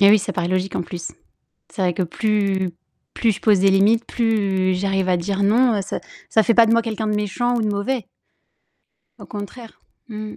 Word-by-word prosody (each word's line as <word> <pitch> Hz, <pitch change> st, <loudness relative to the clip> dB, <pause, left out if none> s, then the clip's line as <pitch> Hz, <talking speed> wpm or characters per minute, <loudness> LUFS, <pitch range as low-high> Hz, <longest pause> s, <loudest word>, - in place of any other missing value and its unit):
Beh 200 Hz, 0 st, +7 dB
oui, 215 Hz, -, +7 dB
ça 200 Hz, -, -4 dB
paraît 175 Hz, -1 st, -2 dB
logique 185 Hz, +1 st, -1 dB
en -, -, -1 dB
plus. 170 Hz, 0 st, -7 dB, 0.6 s
C'est 195 Hz, -, -4 dB
vrai 180 Hz, -1 st, +1 dB
que 185 Hz, -, -1 dB
plus 195 Hz, 0 st, 0 dB, 0.4 s
plus 230 Hz, -2 st, +2 dB
je 200 Hz, -, -8 dB
pose 210 Hz, -3 st, +4 dB
des 195 Hz, 0 st, +4 dB
limites, 210 Hz, +4 st, +3 dB
plus 200 Hz, -5 st, 0 dB
j'arrive 195 Hz, 0 st, -1 dB
à 180 Hz, -, +3 dB
dire: 195 Hz, +3 st, -2 dB
«Non», 235 Hz, +4 st, +3 dB
heu, -, -, 0 dB
ça 190 Hz, -, -5 dB, 0.3 s
ça 220 Hz, -, +3 dB
fait 230 Hz, -, +2 dB
pas 230 Hz, 0 st, +6 dB
de 225 Hz, -, +2 dB
moi 230 Hz, 0 st, +3 dB
quelqu'un 220 Hz, -1 st, -3 dB
de 210 Hz, -, 0 dB
méchant 240 Hz, +4 st, -1 dB
ou 230 Hz, -, 0 dB
de -, -, 0 dB
mauvais. 210 Hz, +3 st, -2 dB, 1.1 s
Au -, -, -11 dB
contraire. 215 Hz, +3 st, -9 dB, 0.3 s
Mmh 215 Hz, -1 st, -6 dB
mh. -, -, -12 dB
205 Hz, 220 wpm, -21 LUFS, 190-225 Hz, 1.1 s, Beh